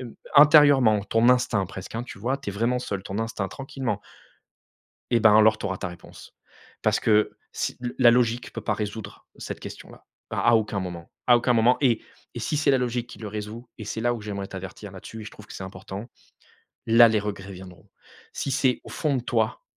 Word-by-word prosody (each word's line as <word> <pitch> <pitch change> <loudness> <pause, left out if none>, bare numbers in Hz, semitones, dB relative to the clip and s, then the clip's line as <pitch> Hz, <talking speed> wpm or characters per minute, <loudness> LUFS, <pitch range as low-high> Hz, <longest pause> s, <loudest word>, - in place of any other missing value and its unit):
Hem, 120 -3 -9 0.2
intérieurement, 145 -7 +7
ton 115 +3 +3
instinct 125 -5 +3
presque, 95 +2 -9
hein, 115 +1 -3
tu 120 - -10
vois? 125 +6 -1
Tu 135 -7 -5
es - - -7
vraiment 115 +5 0
seule, 100 -6 -4
ton 100 +2 -4
instinct 115 -3 -3
tranquillement 135 -5 -4 1.1
Et 120 - +3
ben 110 -1 +6
alors, 110 0 +6
tu - - -6
auras 95 -2 -2
ta - - -4
réponse. 90 -1 -13 0.5
Parce - - +2
que, 105 -1 +2
si - - -3
le 120 -1 -5
la 120 -2 +7
logique 120 0 +1
peut - - -5
pas 105 - -1
résoudre 105 +1 -6
cette - - -6
question-là, - - -11 0.2
à - - -3
à - - +5
aucun 105 -2 0
moment, 90 -2 -7 0.2
à 120 - +7
aucun 120 +1 +1
moment 120 +2 +4
et 120 -5 +3 0.3
et - - -4
si 150 - -1
c'est 145 -1 +3
la 135 - +4
logique 120 -1 -2
qui - - -12
le 110 - -6
résout 110 +3 -7
et 110 - -8
c'est 110 - -4
là 120 +1 +2
où 115 - -8
j'aimerais 100 -2 -5
t'avertir 95 +1 -8
là-dessus 105 +4 -9
et - - -8
je - - -7
trouve 105 - -14
que - - -11
c'est 95 - -7
important. 95 +4 -8 0.8
Là, 115 +1 +7
les 110 -1 +1
regrets 100 -2 -6
viendront. 90 -1 -12 0.4
Si - - -3
c'est 130 -1 +1
au - - -11
fond 150 -4 0
de 125 - -3
toi 110 -2 -1
110 Hz, 220 wpm, -25 LUFS, 100-125 Hz, 1.1 s, intérieurement